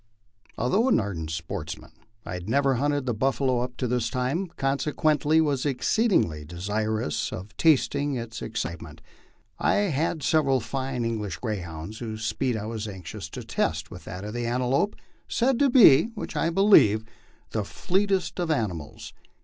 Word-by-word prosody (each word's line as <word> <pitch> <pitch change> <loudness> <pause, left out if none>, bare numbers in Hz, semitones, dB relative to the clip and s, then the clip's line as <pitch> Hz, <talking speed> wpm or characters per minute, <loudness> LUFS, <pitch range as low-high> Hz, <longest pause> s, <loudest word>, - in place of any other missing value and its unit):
Although 205 - +2
an - - +4
ardent 90 -7 -4
sportsman, 80 -1 -5 0.3
I - - -5
had 90 +2 -6
never 140 +2 +3
hunted 145 +2 0
the 120 - 0
buffalo 130 +2 +1
up 125 0 -4
to 130 - -1
this 125 -1 0
time, 135 +9 -1
consequently 150 +2 +2
was 145 -5 +1
exceedingly 130 - +1
desirous 105 +3 -2
of 100 +4 -8
tasting 145 -2 +2
of 115 - -2
its 110 -2 -9
excite 105 -7 -4
ment. 80 -1 -12 0.6
I - - +2 0.2
had 155 +1 -1
several 135 -3 +3
fine 130 0 -3
English 105 -7 -3
greyhounds, 95 -3 -5
whose 110 -2 -5
speed 125 0 0
I 105 - -4
was 110 -1 -4
anxious 95 -5 -7
to - - -7
test - - -2
with - - -10
that 90 +3 -7
of 105 +1 -6
the 120 0 -2
antelope, 130 - +1 0.3
said 245 +1 +1
to 280 - +4
be 225 - +8
which 210 - -6
I 165 - +1
believe 165 - +5 0.5
the 110 - -1
fleetest 190 - 0
of 175 -2 -1
ani 110 - +1
mals. 75 -4 -9
125 Hz, 165 wpm, -26 LUFS, 105-145 Hz, 0.6 s, be